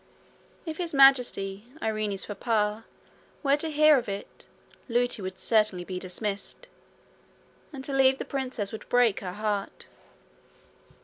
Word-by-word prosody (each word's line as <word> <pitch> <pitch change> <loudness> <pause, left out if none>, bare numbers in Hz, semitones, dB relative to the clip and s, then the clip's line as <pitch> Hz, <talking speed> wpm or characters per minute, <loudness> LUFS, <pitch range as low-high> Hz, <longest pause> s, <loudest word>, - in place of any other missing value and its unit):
If 320 0 -6
His 340 -4 -3
Majesty, 245 -7 +4
Irene's 215 -4 -2
papa, 210 0 -1 0.6
were 280 0 +4
to 320 +2 -2
hear 305 -1 +5
of 230 - -7
it, 200 0 -7 0.4
Lootie 245 -1 +1
would 185 0 -6
certainly 215 -5 +2
be 180 0 -5
dismissed; 200 - -5 1.0
and 270 -3 -8
to 280 - -4
leave 265 0 +4
the - - -5
princess 255 -7 -3
would 220 - -9
break 245 -4 +3
her 180 -2 -6
heart. 205 -1 -3
220 Hz, 130 wpm, -27 LUFS, 200-270 Hz, 1.0 s, hear